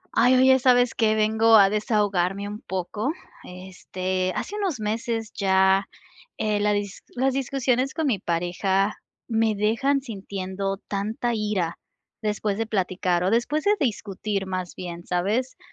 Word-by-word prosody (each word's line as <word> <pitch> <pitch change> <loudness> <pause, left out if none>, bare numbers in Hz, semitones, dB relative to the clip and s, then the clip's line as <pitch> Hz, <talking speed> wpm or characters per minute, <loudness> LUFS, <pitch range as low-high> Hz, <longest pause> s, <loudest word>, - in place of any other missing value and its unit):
Ay, 250 +2 +5
oye, 260 +1 +6
¿sabes 245 -1 +4
qué?, 220 -1 +2
vengo 220 +1 +4
a 200 -2 +7
desahogarme 205 -3 0
un 210 +1 -7
poco. 200 - -3 0.3
Este, 185 0 -4
hace 415 - -4
unos 380 - -1
meses 225 +1 -2
ya, 190 0 +3 0.5
eh, 210 -1 0
la 210 0 +2
dis 205 -1 -3
las 265 +2 +1
discusiones 265 -1 0
con 320 - -1
mi 215 -8 +1
pareja 190 +3 0 0.3
me 225 -2 +1
dejan 230 +7 +1
sintiendo 195 -4 -4
tanta 215 +4 -2
ira 205 -6 -1 0.4
después 210 -1 -1
de 225 - -1
platicar 185 -3 0
o 185 - +1
después 240 +7 +1
de 405 - +4
discutir 210 - -2
más 185 -2 -4
bien, 175 -2 -7
¿sabes?, 210 +9 -1
210 Hz, 140 wpm, -24 LUFS, 190-235 Hz, 0.5 s, a